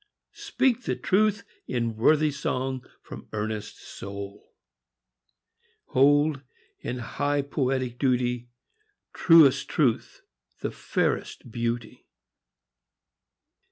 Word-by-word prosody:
speak 255 -2 0
the - - 0
truth 210 +1 +1 0.2
in 115 -2 -1
Worthy 150 +7 +3
song 130 -2 -2 0.2
from - - -10
earnest 105 0 -4
soul! 100 +1 -9 1.4
Hold, 145 +2 +4 0.4
in 125 - -4
high 145 +4 -1
poetic 130 -3 -1
duty, 125 -2 0 0.6
Truest 145 -5 +5
Truth 130 -8 0 0.4
the - - -2
fairest 120 - -2
Beauty! 115 -1 -4
130 Hz, 85 wpm, -26 LUFS, 115-145 Hz, 1.4 s, Truest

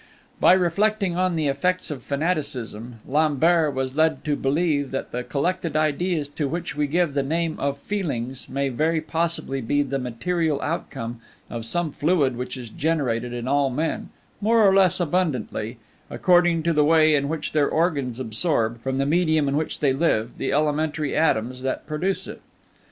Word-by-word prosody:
By - - +6
reflecting 190 +1 +1
on 185 -1 +1
the 160 -2 0
effects 155 +6 0
of 140 - -5
fanaticism, 140 -7 -3
Lambert 155 +1 +2
was 130 0 -2
led 155 -2 +1
to 150 -1 +1
believe 145 0 0
that 135 - -4
the 125 +1 -3
collected 165 +4 -2
ideas 155 +1 0
to 145 0 -2
which 170 +3 -4
we 150 0 0
give 170 0 +1
the 140 - +1
name 160 +3 -1
of 140 0 -1
feelings 140 - -3
may 140 +1 -1
very 160 +6 +1
possibly 160 -4 -1
be 145 +5 +1
the 135 0 -3
material 150 +6 -1
outcome 120 -7 -4 0.3
of 115 -1 -4
some 175 +2 0
fluid 145 -5 +1
which 125 +2 -5
is 120 -3 -8
generated 125 -5 -1
in 120 0 -5
all 140 0 +2
men, 150 +5 -2 0.3
more 220 0 +4
or 190 - +5
less 190 -2 +4
abundantly, 155 -9 -1 0.3
according 175 -2 +3
to 170 0 +1
the 150 -1 +4
way 155 0 +5
in 140 -1 +1
which 160 -1 -3
their 150 -2 +2
organs 140 -7 0
absorb, 115 -1 -1
from 135 +1 -2
the 135 +1 +1
medium 155 -1 +2
in 140 - 0
which 155 +1 -2
they 140 -3 +3
live, 125 -6 +1
the - - -1
elementary 150 0 0
atoms 125 -5 +1
that 130 0 -3
produce 180 +5 -2
it. - - -9
150 Hz, 175 wpm, -24 LUFS, 135-170 Hz, 0.3 s, By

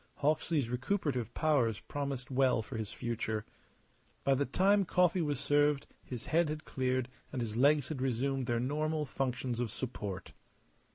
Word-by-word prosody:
Hawksley's 150 -2 +1
recuperative 125 - -1
powers 130 -9 +2
promised 140 -3 -4
well 130 -3 +3
for 125 - -8
his 110 -2 -3
future. 110 -2 -2 0.8
By 135 - +4
the 140 0 +1
time 195 +8 +4
coffee 180 0 +3
was 145 -4 0
served 145 0 +3 0.2
his 120 -3 -6
head 165 0 +2
had 155 0 -4
cleared 130 -1 0 0.2
and 130 - -3
his 110 -3 -3
legs 140 +2 +4
had 140 -5 -3
resumed 135 +1 0
their 120 -1 +1
normal 150 +4 0
functions 125 -2 -2
of 120 -2 0
support. 105 -5 -5
135 Hz, 155 wpm, -33 LUFS, 120-150 Hz, 0.8 s, By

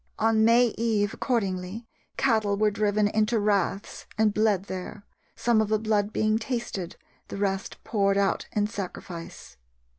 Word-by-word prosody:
On 220 0 +3
May 235 +1 +5
eve, 215 -3 +1
accordingly, 200 -2 -2 0.3
cattle 220 -6 +2
were 210 0 +3
driven 205 0 +1
into 215 +2 +1
raths 205 -1 -1
and 215 -1 +3
bled 210 -3 +2
there, 200 +1 -7 0.3
some 235 -2 +2
of 215 - -1
the 215 - +3
blood 210 -1 0
being 215 0 +1
tasted, 225 -7 -4 0.3
the - - -6
rest 195 0 -2
poured 200 -3 +1
out 200 -1 +1
in 210 -1 +1
sacrifice. 180 - -7
210 Hz, 145 wpm, -26 LUFS, 200-220 Hz, 0.3 s, May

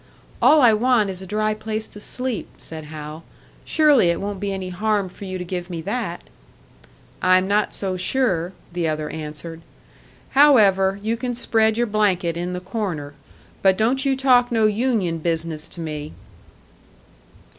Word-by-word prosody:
"All 310 -1 +6
I 230 -3 +7
want 220 -2 +2
is 185 0 -5
a 190 - -9
dry 215 +2 0
place 215 0 -4
to 210 - -10
sleep," 250 +1 -2
said 160 -1 -8
Hal. 155 +1 -8 0.4
"Surely 295 - +4
it 170 - 0
won't 200 -1 -4
be 200 0 -2
any 190 -1 -4
harm 205 +1 -1
for 200 - -11
you 185 -1 -4
to 180 - -5
give 180 0 -5
me 170 -2 -5
that." 200 -2 -4 1.0
"I'm 185 +1 +4
not 205 +1 +1
so 190 -2 -3
sure," 185 -4 0 0.2
the 175 -2 -1
other 155 -1 -3
answered. 160 +1 -7 0.7
"However, 200 -9 +5
you 225 +2 -1
can 245 0 -3
spread 220 -2 +2
your 240 - +2
blanket 195 -6 +1
in 175 +1 -3
the 180 - -3
corner. 180 -7 -4 0.5
But 190 -1 +4
don't 250 +5 +1
you 275 -1 +2
talk 250 -2 +3
no 225 -2 +3
union 215 -6 0
business 160 -1 -1
to 170 - -4
me." 150 -2 -5
195 Hz, 165 wpm, -22 LUFS, 170-225 Hz, 1.0 s, I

